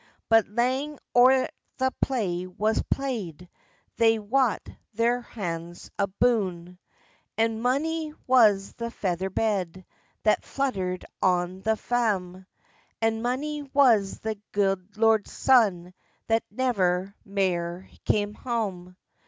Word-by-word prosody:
But 225 -1 +5
lang 260 +7 -1 0.2
or 245 +1 +7
a 265 -1 +2 0.3
the 260 0 +1
play 185 -9 -1
was 215 +4 0
play'd 205 - -3 0.5
They 225 -1 +4
wat 230 +3 0 0.3
their 235 +2 +2
hats 175 -7 -6
aboon, 190 -4 0 0.6
And 225 0 +1
mony 305 +5 0
was 215 -6 +4
the 235 0 -5
feather 190 -4 -2
bed 190 -3 -1 0.4
That 215 - +3
fluttered 190 -10 -2 0.2
on 180 0 +1
the 220 +2 +1
faem, 190 -7 -1 0.5
And 225 0 0
mony 290 +5 -2
was 255 -8 +3
the 220 -2 -3
gude 195 0 0
lord's 220 -1 +3
son 195 -9 +3 0.3
That 225 0 +1
never 200 -6 0
mair 185 -2 -2 0.2
cam 205 0 0
hame. 200 -7 -4
215 Hz, 110 wpm, -26 LUFS, 185-245 Hz, 0.6 s, or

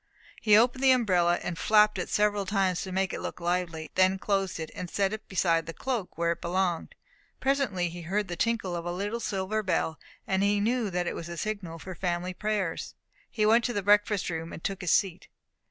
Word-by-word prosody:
He 210 -1 +6
opened 245 +3 +3
the 265 - +6
umbrella, 180 -9 +3
and 170 -1 -4
flapped 210 -2 +4
it 180 - -3
several 205 -1 +1
times 190 -3 +1
to 190 - -5
make 190 +1 0
it - - -4
look - - -5
lively, 170 -2 -2
then 185 +1 +3
closed 195 -2 -1
it, 160 -1 -5
and 180 - -6
set 195 +2 0
it 215 - -7
beside 165 -4 +1
the 165 - -6
cloak 240 -5 -3
where 170 0 +1
it 170 - -4
belonged. 175 -1 -1 0.4
Presently 265 -10 +1
he 175 +1 -7
heard 195 +5 -1
the 175 - -4
tinkle 205 -2 0
of 170 - -4
a 175 - -3
little 205 +6 -3
silver 210 0 -1
bell, 165 -5 -1 0.3
and 190 0 0
knew 205 +3 +1
that 180 -1 -1
it - - -2
was 165 - -6
the 170 0 -7
signal 195 -4 -4
for 185 +4 -8
family 180 0 -2
prayers. 205 -4 -2 0.3
He 215 - 0
went 230 +2 +5
to 245 - -1
the 205 - -2
breakfast 205 0 +3
room, 165 0 -4
and - - -9
took 195 -1 -3
his 180 - -2
seat. 185 0 +1
190 Hz, 215 wpm, -28 LUFS, 175-210 Hz, 0.4 s, He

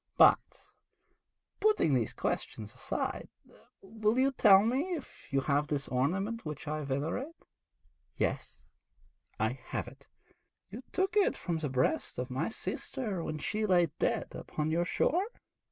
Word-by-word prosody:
But, - - +5 0.9
putting 420 - +3
these 120 -4 +2
questions 105 -1 -3
aside, - - -3 0.5
will 215 +3 0
you 265 +1 +4
tell 200 -6 +7
me 275 +11 0
if 295 - -10
you 135 0 +2
have 145 +2 +1
this 145 -3 -1
ornament 195 - 0
which 155 0 -6
I 155 +1 -2
venerate?' 155 - -2 0.8
'Yes, - - -2 0.8
I - - 0
have - - -3
it.' - - -14 0.6
'You - - -7
took 385 +1 0
it 410 -2 +3
from 170 -3 -2
the 150 -2 -2
breast 130 0 0
of 125 +1 -3
my 130 - -1
sister 220 -5 -3
when 155 - -3
she 215 +8 -1
lay 175 -5 +4
dead - - 0
upon 155 0 -3
your 170 +2 +2
shore?' 355 - +1
175 Hz, 140 wpm, -31 LUFS, 145-245 Hz, 0.9 s, tell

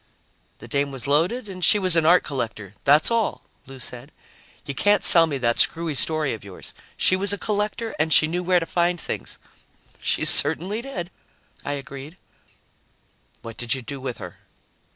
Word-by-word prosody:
"The - - -12
dame 140 0 -1
was 135 -3 -8
loaded 175 - 0
and 185 -2 -8
she 210 - +5
was 185 -4 +1
an 165 -1 +2
art 180 +1 +5
collector, 110 -7 -5
that's 150 +9 +4
all," 230 -2 -1 0.2
Lou 135 -1 -11
said. 120 0 -5 0.5
"You 140 - -4
can't 205 +9 +3
sell 165 -1 +8
me 145 -3 -3
that 120 -2 0
screwy 165 -1 +1
story 155 +2 0
of 110 - -9
yours. 100 -2 -11 0.2
She 185 - +3
was 195 +1 0
a 205 - 0
collector 210 +3 -3
and 160 +1 0
she 155 - +6
knew 175 +3 -2
where 180 0 +2
to 165 - -4
find 175 +1 0
things." - - -4 0.6
"She - - -1
certainly 180 +9 +2
did," 190 -10 -7 0.5
I 145 - -3
agreed. 140 +3 -9 1.3
"What 115 -1 -9
did 120 0 -1
you 130 - -7
do 140 0 -7
with 130 -2 -5
her?" - - -10
160 Hz, 180 wpm, -23 LUFS, 135-185 Hz, 1.3 s, sell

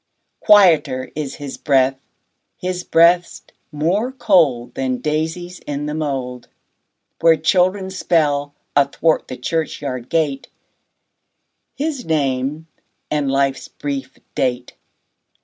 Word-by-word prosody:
20 190 -7 +7
Quieter 130 0 -6
is 145 -3 -4
his 145 -2 -8
breath, 135 -2 +2 0.6
his 180 0 -3
breast 170 +1 +2 0.2
more 175 - 0
cold 165 - +2
Than 130 -1 -1
daisies 160 +5 -3
in 145 0 -3
the 150 - -3
mould, 135 -5 -4 0.7
Where 165 -1 +5
children 185 +4 +1
spell, 145 -6 0 0.2
athwart 145 +3 +2
the 130 - -7
churchyard 130 -3 -3
gate, 150 -5 0 1.3
His 290 -3 -3
name 145 - -1 0.5
and 145 -2 0
life's 135 0 0
brief 140 -2 -5 0.2
date. 125 -1 -1
150 Hz, 105 wpm, -19 LUFS, 135-170 Hz, 1.3 s, 20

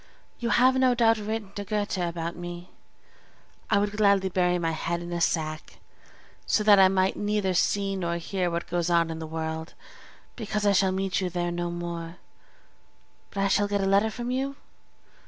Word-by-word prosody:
You 235 - -2
have 255 +2 +4
no 255 -1 +3
doubt 225 -2 +3
written 215 -1 -4
to 205 0 -5
Goethe 205 -1 -2
about 170 -1 -3
me? 175 0 -8 1.0
I 210 - +4
would 205 0 +1
gladly 200 -2 +3
bury 180 -1 +1
my 165 -2 -1
head 170 +2 -2
in 175 0 -6
a 170 - -2
sack, 155 -2 -2 0.7
so 210 - +2
that 205 -2 +7
I 190 - +8
might 190 0 +1
neither 205 -2 0
see 195 +2 +1
nor 170 -2 -2
hear 180 +1 -2
what 170 0 -3
goes 175 0 -1
on 170 -1 +2
in 160 - -5
the 160 - -6
world, 160 0 -5 0.6
because 210 -2 -3
I 205 - +5
shall 190 -1 +3
meet 190 0 -1
you 185 - -1
there 175 0 -2
no 175 0 -2
more; 170 0 -5 1.1
but 195 - -4
I - - +3
shall 205 +1 +2
get 205 0 0
a - - 0
letter 200 +3 +3
from 240 +2 -5
you? 270 +2 -2
190 Hz, 190 wpm, -26 LUFS, 170-205 Hz, 1.1 s, I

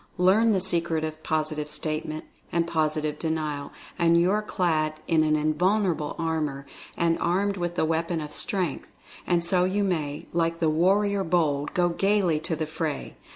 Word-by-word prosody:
Learn 200 +5 +4
the 195 - +2
Secret 170 -3 0
of 155 0 -4
Positive 155 -1 -2
Statement, 155 0 -3 0.3
and 170 -1 +1
Positive 155 -2 -1
Denial, 155 -3 -2 0.3
and 170 0 +4
you 175 +2 +3
are 210 +1 +2
clad 160 -7 0
in 160 -2 +3
an 155 0 +2
invulnerable 160 +1 +1
armor 155 -4 -2 0.3
and 165 -1 +1
are 175 +1 +1
armed 200 0 0
with 175 -2 -3
the 160 - +1
weapon 165 +1 0
of 150 -1 -6
Strength 180 -2 -2 0.2
— - - -19
and 175 -1 +2
so 180 +1 +3
you 195 +3 +1
may, 155 -7 -2
like 165 0 0
the 160 -2 +2
"Warrior 195 +5 +2
Bold" 155 -5 0
go 175 -1 +3
"gaily 190 -3 +2
to 160 +1 -2
the 155 0 -2
fray." 155 -1 -4
165 Hz, 175 wpm, -26 LUFS, 155-180 Hz, 0.3 s, Learn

